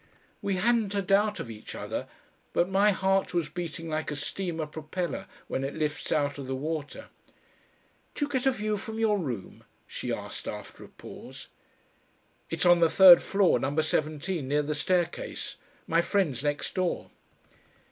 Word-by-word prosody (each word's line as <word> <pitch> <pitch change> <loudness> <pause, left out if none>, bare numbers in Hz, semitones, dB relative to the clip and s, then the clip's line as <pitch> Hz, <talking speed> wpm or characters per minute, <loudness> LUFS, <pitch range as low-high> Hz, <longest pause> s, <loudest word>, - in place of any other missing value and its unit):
We 200 -1 0
hadn't 215 +1 +2
a 200 - +1
doubt 205 +3 +2
of 115 - -5
each 105 -1 -9
other, - - -4 0.5
but 175 - +3
my 195 +2 +4
heart 195 -1 +1
was 165 -4 +1
beating 165 -1 -5
like 155 0 -2
a 150 - -3
steamer 165 +2 -3
propeller 170 +5 -4 0.2
when 130 - -2
it 135 - -3
lifts 150 -1 -2
out 145 -1 +1
of 135 - -6
the 135 - -2
water. 155 - -4 1.1
"Do 290 - 0
you 290 - -10
get 260 -1 +1
a - - +6
view 215 -3 -1
from 220 +2 -6
your 215 -2 +2
room?" 120 - -5 0.2
she - - -5
asked - - -5
after - - -7
a - - -11
pause. - - -11 1.0
"It's 165 +2 -1
on 175 -1 +7
the 165 -1 +5
third 185 -1 +9
floor, 195 -10 +3
Number 145 +5 0
seventeen, 155 0 -1
near 145 +2 +2
the 150 +1 -1
staircase. 175 +4 -1 0.3
My 165 +1 +3
friend's 165 - 0
next 145 0 -1
door." 185 -2 -1
170 Hz, 165 wpm, -28 LUFS, 150-195 Hz, 1.1 s, third